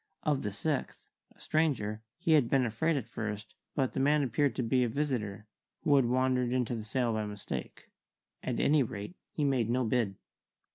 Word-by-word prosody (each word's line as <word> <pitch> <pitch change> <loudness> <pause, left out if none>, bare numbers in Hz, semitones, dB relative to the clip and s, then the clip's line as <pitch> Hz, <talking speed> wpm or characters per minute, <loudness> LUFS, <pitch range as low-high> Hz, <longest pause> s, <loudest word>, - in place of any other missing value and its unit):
Of 150 -3 +1
the 105 - -2
sixth, 145 +8 -3 0.3
a - - -26
stranger, 125 -10 0 0.2
he 165 - 0
had 145 -7 +5
been 135 -2 +3
afraid 120 +9 +1
at 130 - -3
first, 110 -1 -5 0.2
but 135 -4 +1
the - - -1
man 145 +2 +4
appeared 135 +2 +1
to 125 - 0
be 125 +2 +3
a 120 - +1
visitor, 110 -7 -2 0.4
who 145 - +4
had 135 -3 +5
wandered 125 0 +2
into 125 -2 0
the 115 -2 -3
sale 120 +1 0
by 110 -1 -1
mistake. 105 -1 -6 0.6
At - - -2
any 150 0 +4
rate, 115 - -4 0.2
he 150 - -2
made 130 -5 +2
no 125 +2 +2
bid. 110 -4 +1
125 Hz, 190 wpm, -31 LUFS, 110-140 Hz, 0.6 s, had